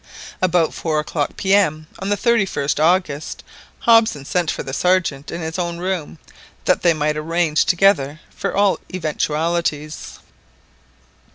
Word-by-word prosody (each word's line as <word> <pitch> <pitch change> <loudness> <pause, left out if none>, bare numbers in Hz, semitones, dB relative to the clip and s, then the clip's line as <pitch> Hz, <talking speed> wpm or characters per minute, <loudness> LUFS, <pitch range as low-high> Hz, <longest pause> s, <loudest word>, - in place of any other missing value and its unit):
About 175 -3 +2
four 155 -2 -1
o'clock 150 -1 -3
P.M., 190 -6 +2
on 195 - -3
the 205 - +1
31st 195 - +1
August, 165 -3 0 0.4
Hobson 225 -11 +4
sent 175 +1 0
for - - -2
the 135 - -7
Sergeant 170 -4 +1
in 170 - -5
his 160 +3 -4
own 170 -1 -2
room, 180 -3 -3 0.5
that 185 - +2
they 170 -2 +4
might 150 0 0
arrange 160 0 +1
together 165 -6 +2 0.2
for - - -2
all 200 -1 +3
eventualities. 155 -2 -2
170 Hz, 130 wpm, -20 LUFS, 150-185 Hz, 0.5 s, Hobson